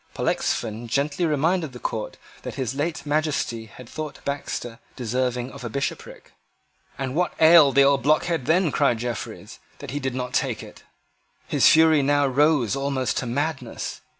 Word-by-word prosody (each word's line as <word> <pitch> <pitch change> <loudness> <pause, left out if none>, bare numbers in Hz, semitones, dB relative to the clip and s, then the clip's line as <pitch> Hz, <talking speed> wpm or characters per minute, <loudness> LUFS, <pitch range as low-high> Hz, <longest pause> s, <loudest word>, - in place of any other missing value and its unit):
Pollexfen 115 +1 -1
gently 145 +7 0
reminded 160 0 0
the 125 - -9
court 110 -2 -4 0.2
that - - -7
his 130 -2 -2
late 155 +4 -3
Majesty 145 -6 -1
had 125 +2 -13
thought 155 +3 -6
Baxter 125 -4 -4 0.2
deserving 125 +1 -2
of - - -10
a 120 - -4
bishopric. 140 +5 -5 0.7
"And 130 -1 -3
what 180 +4 0
ailed 160 -4 +7
the 140 - +7
old 140 0 +3
blockhead 155 +1 +1
then," 170 0 +3
cried 135 -5 +2
Jeffreys, 120 -1 -6 0.2
"that - - -8
he 145 - -3
did 130 -2 -3
not 125 -1 -4
take - - -1
it?" - - -13 0.7
His - - +5
fury 160 -2 +5
now 145 +1 +2
rose 140 -4 +2
almost 135 -2 -1
to 125 - -2
madness. 135 -1 -3
140 Hz, 160 wpm, -24 LUFS, 125-155 Hz, 0.7 s, ailed